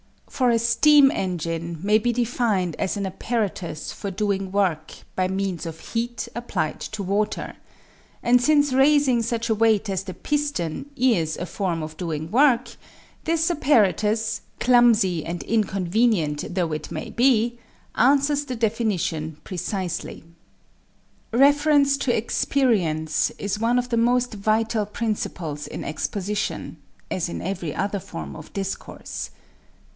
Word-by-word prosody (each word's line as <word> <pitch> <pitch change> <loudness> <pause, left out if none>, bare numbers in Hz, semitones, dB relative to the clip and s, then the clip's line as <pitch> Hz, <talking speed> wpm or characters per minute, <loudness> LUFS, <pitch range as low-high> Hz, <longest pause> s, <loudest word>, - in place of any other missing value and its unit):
For 255 -2 +1
a 235 - +4
steam 270 +5 +5
engine 170 -2 -3
may 210 +2 +4
be 240 +2 +1
defined 230 -7 0
as 195 +1 -1
an 200 - -2
apparatus 190 -5 -3
for 200 - -5
doing 195 -1 -1
work 180 -6 0 0.2
by 185 0 +1
means 190 -3 -2
of 160 -1 -7
heat 235 +1 -2
applied 195 -10 -3
to 215 -2 -5
water; 200 +3 -2 0.7
and 245 +1 +4
since 290 0 +3
raising 270 -2 +4
such 230 0 -2
a - - +4
weight 220 -1 +2
as 190 0 -2
the 185 - -7
piston 285 - -2
is 220 - +1
a 175 - -3
form 175 -4 -2
of 155 0 -8
doing 160 -2 -4
work, 255 0 +3 0.5
this 330 +1 +1
apparatus, 220 - +2 0.2
clumsy 230 -9 +4
and 170 +1 -5
inconvenient 195 -6 0
though 175 -4 0
it 155 - -4
may 230 - -5
be, 240 -1 +2 0.3
answers 280 +3 +3
the 255 -2 -4
definition 205 -9 -1
precisely. 185 -2 -4 1.1
=Reference 285 +2 +4
to 245 -3 +1
Experience= 190 - +1
is 205 +1 -3
one 235 +2 +2
of 250 0 -1
the 235 - 0
most 245 +1 +2
vital 215 +1 0
principles 185 -9 -3
in - - -6
exposition 200 +6 -3 0.3
as 180 -2 -1
in - - -4
every 175 -5 -3
other 200 +1 -1
form 75 - -8
of - - -11
discourse. 195 -1 -5
215 Hz, 135 wpm, -24 LUFS, 180-240 Hz, 1.1 s, steam